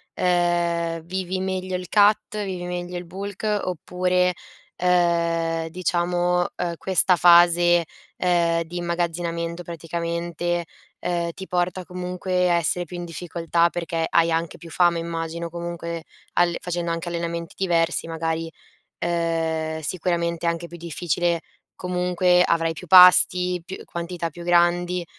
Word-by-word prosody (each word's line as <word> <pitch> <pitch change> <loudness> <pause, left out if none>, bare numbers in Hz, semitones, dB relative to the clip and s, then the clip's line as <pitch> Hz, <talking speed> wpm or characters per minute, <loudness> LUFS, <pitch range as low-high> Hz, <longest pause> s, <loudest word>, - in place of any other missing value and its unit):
uhm, 175 -2 +1
vivi 185 +2 -3
meglio 185 0 -3
il 180 -1 -5
cut 210 0 +3
vivi 185 -2 -4
meglio 180 0 -4
il 175 - -6
bulk 195 +4 -7 0.2
oppure, 180 +1 0 0.4
uhm, 170 -2 +1
diciamo, 175 0 0
uhm, 175 -1 -2
questa 185 0 +3
fase, 175 0 +6 0.3
uhm, 170 -2 +2
di 170 +2 -8
immagazzinamento 170 0 -2
praticamente, 170 +1 -3 0.4
uhm, 170 -1 -1
ti 190 - -8
porta 180 0 -1
comunque 180 0 -1
a 175 - +4
essere 170 +1 0
più 175 +2 -8
in 175 - -5
difficoltà 170 0 0
perché 165 -1 -2
hai 170 0 +3
anche 165 0 -1
più 165 0 -12
fame 175 +1 +3
immagino, 165 0 -4
comunque 170 -1 -5 0.3
alle 175 -1 +2
facendo 175 -1 -3
anche 165 +1 -3
allenamenti 170 0 -4
diversi 170 -3 0
magari, 165 0 -3 0.5
uhm, 165 -2 -1
sicuramente 170 +1 -2
è - - +4
anche 170 0 -4
più 175 - -10
difficile 170 0 -1 0.3
comunque, 180 0 +2
avrai 165 -1 +1
più 180 - -10
pasti, 180 0 +7
più 190 - -7
quantità 170 0 -4
più 170 +3 -10
grandi, 175 0 +2
175 Hz, 130 wpm, -23 LUFS, 170-180 Hz, 0.5 s, pasti